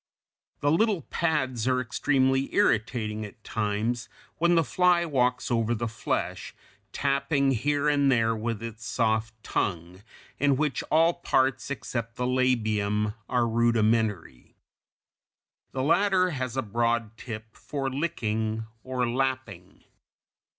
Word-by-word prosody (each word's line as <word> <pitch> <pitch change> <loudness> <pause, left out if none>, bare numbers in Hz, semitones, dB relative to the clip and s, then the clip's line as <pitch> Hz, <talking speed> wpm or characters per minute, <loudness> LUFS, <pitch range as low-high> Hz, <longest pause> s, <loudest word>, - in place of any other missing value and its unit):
The 145 - +2
little 200 -1 +2
pads 130 -9 -1
are 130 -1 +2
extremely 135 +1 +1
irritating 110 - +1
at 105 +1 -11
times 110 +3 -2 0.3
when 170 +1 +4
the 165 - +4
fly 175 +3 +3
walks 125 -5 0
over 115 0 +1
the 115 +1 -2
flesh, 110 -1 -3 0.4
tapping 140 +1 +1
here 145 +4 +1
and 140 -2 +3
there 115 -2 +2
with 115 0 -3
its 115 -1 -7
soft 110 -1 0
tongue, 90 0 -2 0.4
in 140 -1 +3
which 150 -4 0
all 165 +2 +4
parts 135 -7 0
except 115 -4 -4
the 125 - -2
labium 110 -5 +1 0.2
are 120 -1 +2
rudimentary. 110 - 0 1.2
The 130 - -2
latter 185 +3 +3
has 130 -3 -3
a 130 - +1
broad 115 +1 0
tip 110 -2 -8
for 140 -2 -4
licking 110 -7 -2 0.2
or 130 -1 -1
lapping. 120 -7 -3
125 Hz, 120 wpm, -27 LUFS, 110-140 Hz, 1.2 s, when